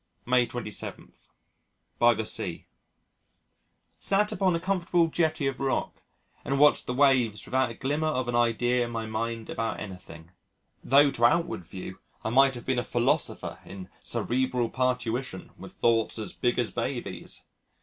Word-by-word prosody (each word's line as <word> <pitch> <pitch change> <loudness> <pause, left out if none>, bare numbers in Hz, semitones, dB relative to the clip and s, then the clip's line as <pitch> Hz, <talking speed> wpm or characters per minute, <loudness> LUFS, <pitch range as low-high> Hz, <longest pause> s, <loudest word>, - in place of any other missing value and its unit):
May 125 -1 +3
27. 120 -3 -6 0.9
By 120 0 +6
the 110 +1 -3
Sea - - -4 1.3
Sat 205 +1 +1
upon 185 -3 +2
a - - 0
comfortable 175 -2 +1
jetty 155 -3 0
of 135 -1 -1
rock 135 -1 -2 0.4
and 140 - -1
watched 150 +1 +5
the 125 - -1
waves 125 -7 +3
without 130 -1 +1
a 115 - -8
glimmer 145 +6 -1
of 130 -5 -1
an 120 - -1
idea 120 +1 +2
in 120 - -4
my 115 -1 -3
mind 115 +1 -3
about 115 -1 -2
anything 85 -4 -10 0.5
though 140 +2 +5
to 120 -3 +2
outward 165 - +2
view 95 +1 -8 0.2
I 110 - -2
might 135 +1 +5
have 120 - -8
been 130 -2 +1
a - - -1
philosopher 120 -1 -1
in 95 -1 -10
cerebral 125 -1 -1
parturition 125 -1 -2
with - - -11
thoughts 115 -1 +1
as 110 - -4
big 120 - 0
as 120 -5 0
babies. - - -4
125 Hz, 155 wpm, -27 LUFS, 115-135 Hz, 1.3 s, By